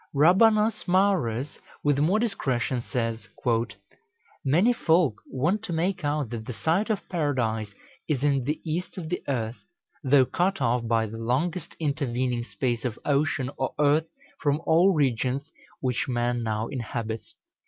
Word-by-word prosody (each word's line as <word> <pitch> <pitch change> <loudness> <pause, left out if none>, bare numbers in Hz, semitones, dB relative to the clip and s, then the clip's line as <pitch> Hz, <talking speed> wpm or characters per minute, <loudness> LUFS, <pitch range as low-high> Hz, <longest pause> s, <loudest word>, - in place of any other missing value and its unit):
Rabanus 210 +8 +4
Maurus, 175 - +1 0.2
with 145 -1 +2
more 170 +8 +3
discretion, 130 - -1
says, 115 -2 -3 1.2
"Many 175 - +4
folk 160 - +2
want 170 +11 0
to 180 - -3
make 180 +2 -1
out 145 -4 -1
that 110 -2 -5
the 125 - -4
site 165 - 0
of 210 -2 -1
Paradise 115 - -1 0.3
is 140 -3 0
in 140 -3 +2
the 150 +3 -1
east 165 +4 -3
of 165 -4 -5
the 180 - -2
earth, 120 -4 -2 0.5
though 135 -1 +5
cut 185 +7 0
off 120 -2 +1
by 115 -1 +2
the 110 +1 -7
longest 150 +9 -1
intervening 130 -5 -1
space 120 -2 -2
of 120 -3 -2
ocean 140 -2 +1
or 130 - -2
earth 150 +2 +3 0.3
from 145 0 +1
all 170 +4 +5
regions 135 -1 0 0.3
which 125 -2 -1
man 120 -1 0
now 110 -1 -1
inhabits. 115 -3 -5
140 Hz, 145 wpm, -26 LUFS, 120-165 Hz, 1.2 s, though